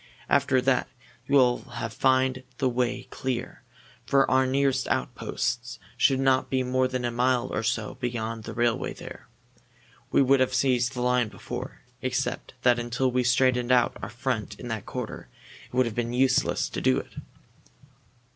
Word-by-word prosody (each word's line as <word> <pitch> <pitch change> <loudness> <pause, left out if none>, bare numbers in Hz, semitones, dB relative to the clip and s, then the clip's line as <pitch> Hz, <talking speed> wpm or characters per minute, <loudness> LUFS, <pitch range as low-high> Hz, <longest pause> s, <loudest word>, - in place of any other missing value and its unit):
After 130 -1 +3
that 130 0 +1 0.4
you 140 - +2
will 125 -3 +5
find 130 +3 0 0.2
the 130 - +1
way 125 0 -1
clear, 125 -3 -4 0.4
for 135 +1 +3
our 130 0 +4
nearest 135 0 +1
outposts 120 +1 -2 0.2
should 135 -2 +3
not 135 -1 +2
be 130 -1 +1
more 130 +1 +1
than 130 -1 -3
a 120 - 0
mile 125 +1 +1
or - - 0
so 110 +1 -2
beyond 115 -3 -3
the - - -7
railway 120 -1 0
there. - - -11 0.8
We - - +4
would 135 +1 +4
have 130 0 +1
seized 125 -1 +2
the 125 - -4
line 125 -1 +2
before, 100 -3 -7 0.2
except 130 0 -2
that 125 -1 +4
until 120 +2 0
we 125 +1 +2
had 120 - 0
straightened 125 0 +2
our 125 -1 +2
front 120 -4 -3
in 120 - -7
that 110 -3 -4
quarter 125 -3 -6 0.4
it - - -28
would 130 0 +4
have 115 - -3
been 120 +1 -2
useless 130 +1 +2
to - - -4
do 65 - +3
it." - - -6
125 Hz, 165 wpm, -26 LUFS, 120-130 Hz, 0.8 s, will